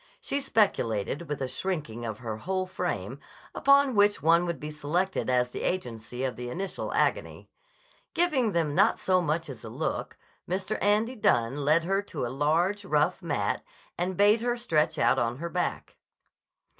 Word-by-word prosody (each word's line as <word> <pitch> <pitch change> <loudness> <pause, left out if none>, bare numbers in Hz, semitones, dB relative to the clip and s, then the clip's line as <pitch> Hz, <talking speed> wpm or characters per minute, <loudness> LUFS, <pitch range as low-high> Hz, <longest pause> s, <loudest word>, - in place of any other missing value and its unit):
She 280 - -2
speculated, 155 - 0
with 145 -2 -2
a - - -1
shrinking 130 -5 -3
of 110 -2 -4
her 110 -2 -5
whole 185 +9 -2
frame, 185 - -4 0.3
upon 280 -1 +4
which 205 -1 +4
one 170 +3 +4
would 170 -5 -3
be 150 +2 -6
selected 155 +5 -1
as 125 -1 +2
the - - -5
agency 125 -7 -3
of 130 -2 -1
the 125 0 -6
initial 190 +7 -4
agony. - - -1 0.6
Giving 270 - +2
them 160 -4 +1
not - - +4
so 185 -1 +2
much 160 0 -1
as 130 -6 -9
a - - -7
look, - - -3 0.3
Mr. 190 +4 -2
Andy 215 +5 +2
Dunne 120 - +2
led 150 +3 +3
her 195 +3 +1
to 160 -10 -5
a 120 - -4
large, 170 +9 +1
rough 155 +1 +1
mat 125 - -1 0.3
and 180 +1 -2
bade 210 +2 +5
her 240 0 0
stretch 160 -10 +1
out 120 +3 +3
on 120 0 -1
her 170 +4 -4
back. 180 +1 -3
170 Hz, 170 wpm, -28 LUFS, 130-195 Hz, 0.6 s, bade